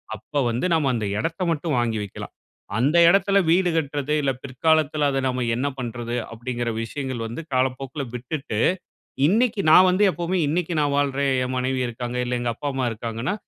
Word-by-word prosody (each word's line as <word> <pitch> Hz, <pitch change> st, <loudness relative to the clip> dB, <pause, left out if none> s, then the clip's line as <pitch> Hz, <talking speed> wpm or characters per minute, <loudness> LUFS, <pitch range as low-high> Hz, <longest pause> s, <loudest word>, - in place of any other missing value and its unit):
அப்ப 145 Hz, +7 st, -3 dB
வந்து 120 Hz, +7 st, -1 dB
நாம 150 Hz, -4 st, +2 dB
அந்த 110 Hz, -, -2 dB
எடத்த 165 Hz, +9 st, -2 dB
மட்டும் 160 Hz, 0 st, -1 dB
வாங்கி 115 Hz, -2 st, 0 dB
வைக்கலாம். 100 Hz, -, -8 dB, 0.4 s
அந்த 140 Hz, +8 st, +2 dB
எடத்துல 200 Hz, +1 st, +3 dB
வீடு 180 Hz, +2 st, +4 dB
கட்டுறது, 145 Hz, -2 st, -1 dB
இல்ல 135 Hz, -2 st, +1 dB
பிற்காலத்துல 150 Hz, +2 st, +1 dB
அத 135 Hz, -, 0 dB
நாம 125 Hz, -1 st, -1 dB
என்ன 130 Hz, +4 st, -1 dB
பண்றது 120 Hz, 0 st, -4 dB, 0.2 s
அப்டிங்கிற 120 Hz, +1 st, -3 dB
விஷயங்கள் 130 Hz, +1 st, -4 dB
வந்து 115 Hz, +8 st, -6 dB
காலப்போக்குல 130 Hz, +2 st, -1 dB
விட்டுட்டு, 125 Hz, -2 st, -4 dB, 0.7 s
இன்னிக்கு 220 Hz, +3 st, +2 dB
நான் 185 Hz, +3 st, +8 dB
வந்து 185 Hz, +3 st, +1 dB
எப்பவுமே. 175 Hz, +3 st, -2 dB
இன்னிக்கு 170 Hz, +2 st, -1 dB
நான் 145 Hz, -1 st, +1 dB
வாழ்றேன், 140 Hz, -1 st, +1 dB
என் 130 Hz, 0 st, -3 dB
மனைவி 130 Hz, +1 st, -1 dB
இருக்காங்க, 120 Hz, +1 st, -5 dB
இல்ல 125 Hz, 0 st, -1 dB
எங்க 120 Hz, -, -1 dB
அப்பா, 145 Hz, -, -4 dB
அம்மா 130 Hz, -1 st, 0 dB
இருக்காங்கன்னா, 115 Hz, -, -3 dB
135 Hz, 170 wpm, -23 LUFS, 120-155 Hz, 0.7 s, நான்